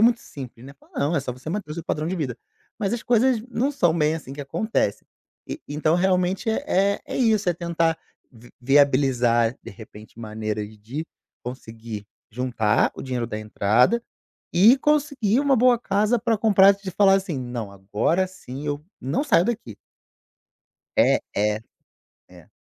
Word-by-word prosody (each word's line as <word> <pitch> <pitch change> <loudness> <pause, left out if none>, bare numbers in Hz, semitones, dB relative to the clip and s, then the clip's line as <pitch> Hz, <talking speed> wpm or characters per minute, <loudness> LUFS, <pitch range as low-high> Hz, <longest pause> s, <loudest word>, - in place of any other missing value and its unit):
muito 235 0 +4
simples, 130 -3 -10
né: 140 - -11
"Fala - - -26
não, 155 +4 +1
é - - +2
só 130 -2 -4
você 125 +5 -10
manter 195 -1 -4
o - - -4
seu 170 - -5
padrão 155 -1 -2
de 180 - -2
vida". 140 -9 -3 0.4
Mas 205 -3 -1
as 235 -2 -2
coisas 245 0 +3
não 250 +3 0
são 175 - +2
bem, 155 -1 +2
assim, 140 -4 -7
que 145 - -7
acontece. 140 - -1 0.4
E, - - -5
então, 150 +2 0
realmente 185 +3 +1
é-é, 200 -6 0
isso, 220 -6 +2
é 175 - +2
tentar 170 -1 0 0.3
vi 120 -1 -17
viabilizar, 130 -3 +3
de - - -9
repente, 110 +1 -13
maneiras 110 -1 -5
de 130 +10 -6 0.4
conseguir 115 -4 -8 0.2
juntar 115 -3 +1
o - - -8
dinheiro 125 -3 -3
da 110 -2 -5
entrada 110 - +2 0.5
e 205 +9 +7
conseguir 280 -6 +1
uma 280 -2 +3
boa 245 +1 +4
casa 215 +1 +1
pra 230 0 +1
comprar 200 -2 +6
e 200 - -21
de 190 - -3
falar, 195 +1 +4
assim: 190 -7 -1
"Não, 120 -4 -5
agora 105 - 0
sim 145 -6 -9
eu 145 0 -3 0.2
não 140 - -1
saio 200 - +4
daqui". 225 - -3 1.2
É, - - +4 0.2
é. 105 +1 +1 0.7
É. - - -17
155 Hz, 165 wpm, -23 LUFS, -, 1.2 s, e